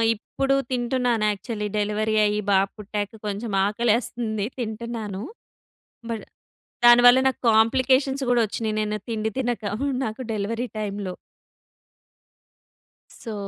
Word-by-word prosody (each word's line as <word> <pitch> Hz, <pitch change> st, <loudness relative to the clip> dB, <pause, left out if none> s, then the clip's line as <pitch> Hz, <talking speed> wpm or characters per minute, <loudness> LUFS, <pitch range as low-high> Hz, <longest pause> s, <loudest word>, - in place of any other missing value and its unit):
ఇప్పుడు 270 Hz, +5 st, -1 dB, 0.2 s
తింటున్నాను 245 Hz, -2 st, +1 dB
actually. 210 Hz, +1 st, -4 dB
Delivery 210 Hz, +1 st, 0 dB
అయ్యి 210 Hz, 0 st, 0 dB
బాబు 195 Hz, 0 st, +3 dB
పుట్టాక 205 Hz, -1 st, -4 dB, 0.2 s
కొంచెం 210 Hz, +2 st, -4 dB
ఆకలేస్తుంది 220 Hz, 0 st, 0 dB
తింటున్నాను. 220 Hz, -3 st, -4 dB, 0.9 s
బట్ 225 Hz, -, -4 dB, 0.6 s
దానివల్ల 245 Hz, +1 st, +8 dB
నాకు 260 Hz, -, -4 dB
కాంప్లికేషన్స్ 260 Hz, +5 st, +3 dB
గూడా 240 Hz, -1 st, +4 dB
వచ్చినయి 215 Hz, +1 st, -3 dB
నేను 210 Hz, 0 st, -1 dB
తిండి 220 Hz, -1 st, -1 dB
తినక 245 Hz, -4 st, -2 dB, 0.4 s
నాకు 220 Hz, +3 st, -5 dB
డెలివరీ 225 Hz, +3 st, -2 dB
టైమ్‌లో. 200 Hz, -3 st, -4 dB, 2.1 s
సో, 225 Hz, -2 st, -5 dB
220 Hz, 100 wpm, -24 LUFS, 210-240 Hz, 2.1 s, దానివల్ల